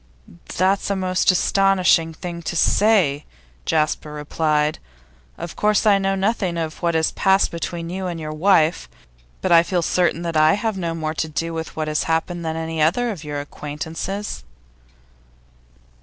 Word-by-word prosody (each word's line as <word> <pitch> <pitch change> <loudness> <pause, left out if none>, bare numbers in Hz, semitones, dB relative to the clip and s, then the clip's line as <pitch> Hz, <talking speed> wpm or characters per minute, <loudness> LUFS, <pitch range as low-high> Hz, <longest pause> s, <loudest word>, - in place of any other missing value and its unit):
'That's 190 +3 +1
a 200 - +1
most 185 -1 +1
astonishing 185 -3 +3
thing 170 +1 -7
to 170 - -4
say,' 170 -6 +3 0.4
Jasper 155 -1 0
replied. 150 0 0 0.6
'Of 170 0 -7
course 210 0 +2
I 205 -2 +5
know 195 0 0
nothing 195 -3 -1
of 160 -2 -4
what 170 -1 0
has 160 0 +2
passed 195 0 +2
between 170 0 -5
you 190 0 -3
and 170 -2 -4
your 155 -1 -5
wife, 165 0 +2 0.5
but - - -1
I 165 -1 +8
feel 175 0 -1
certain 175 0 +1
that 170 -1 -3
I 155 0 +5
have 220 0 -2
no 170 -3 -3
more 155 -1 -3
to 160 0 -3
do 165 +2 -3
with 160 0 -5
what 155 -1 -2
has 155 0 -1
happened 170 +2 -1
than 160 -1 -3
any 160 -1 -3
other 230 +10 +2
of 175 -7 -8
your 145 -1 -4
acquaintances. 160 - -5
170 Hz, 165 wpm, -21 LUFS, 155-190 Hz, 0.6 s, I